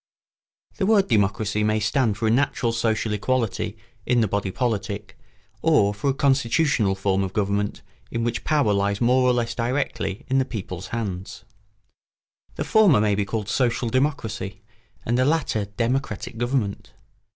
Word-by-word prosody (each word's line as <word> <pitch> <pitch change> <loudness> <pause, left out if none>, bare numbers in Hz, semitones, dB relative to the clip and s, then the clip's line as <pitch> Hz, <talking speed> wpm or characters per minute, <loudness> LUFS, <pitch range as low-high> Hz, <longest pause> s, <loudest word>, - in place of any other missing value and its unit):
] - - -42
The 190 - +1
word 210 -3 +4
democracy 105 -1 +1
may 110 0 +2
stand 110 0 +1
for 110 - -2
a - - +3
natural 120 -1 +1
social 110 -1 0
equality 110 -1 -1 0.3
in 120 +3 +2
the 110 - +2
body 100 0 -1
politic 105 -2 -3 0.5
or 130 -11 +3
for 105 +7 -1
a - - +2
constitutional 135 -6 +2
form 95 0 0
of 95 -1 -4
government 100 0 -1 0.3
in 115 - -2
which 115 0 -2
power 145 -9 +2
lies 100 0 0
more 125 +2 +3
or 125 0 +4
less 120 -1 0
directly 120 -5 -2
in 135 0 +2
the - - +3
people's 95 -7 -6
hands. 100 -3 -5 1.1
The - - -2
former 205 - +5
may 105 -1 +2
be 100 0 0
called 105 0 -3
social 120 0 0
democracy 110 -7 -2 0.4
and 120 +2 +1
the - - +4
latter 140 -8 +1
democratic 115 +1 -2
government. 120 -5 -2
115 Hz, 160 wpm, -24 LUFS, 100-130 Hz, 1.1 s, former